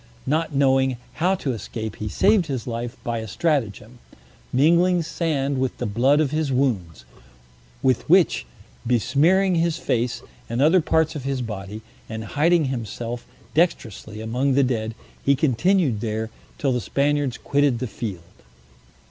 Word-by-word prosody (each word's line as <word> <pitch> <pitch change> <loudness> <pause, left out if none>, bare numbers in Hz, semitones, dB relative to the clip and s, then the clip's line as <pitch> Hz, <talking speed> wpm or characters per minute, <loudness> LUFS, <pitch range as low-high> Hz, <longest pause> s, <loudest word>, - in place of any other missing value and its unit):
Not 155 +4 0
knowing 135 -2 +3 0.2
how 185 +3 +3
to 145 -8 -2
escape, 110 -1 -6
he 105 - -4
saved 195 - +3
his 130 -6 -3
life 120 0 -4
by 115 -1 -2
a 110 - -6
stratagem; 120 - -2 0.5
mingling 170 +6 +4
sand 145 -5 -1
with 130 -1 -1
the - - -3
blood 125 +8 +3
of 150 -3 +1
his 155 -2 0
wounds, 95 - -1 0.8
with 130 +3 +1
which 170 - +4 0.4
besmearing 150 - +3
his 170 0 +1
face, 120 -3 -1 0.3
and 115 +1 -2
other 160 +6 +5
parts 160 0 +1
of 145 - -5
his 135 -2 -2
body, 105 -1 -6 0.3
and 110 0 -5
hiding 165 +2 +3
himself 120 -1 -4 0.3
dextrously 110 - -1
among 125 +4 0
the 140 - +4
dead, 115 -3 -1 0.3
he 140 - +4
continued 145 - +2
there 110 0 -3 0.3
till 140 - 0
the 125 -1 0
Spaniards 140 +3 0
quitted 140 -3 +1
the 130 - -3
field. 105 - -6
130 Hz, 150 wpm, -23 LUFS, 115-155 Hz, 0.8 s, other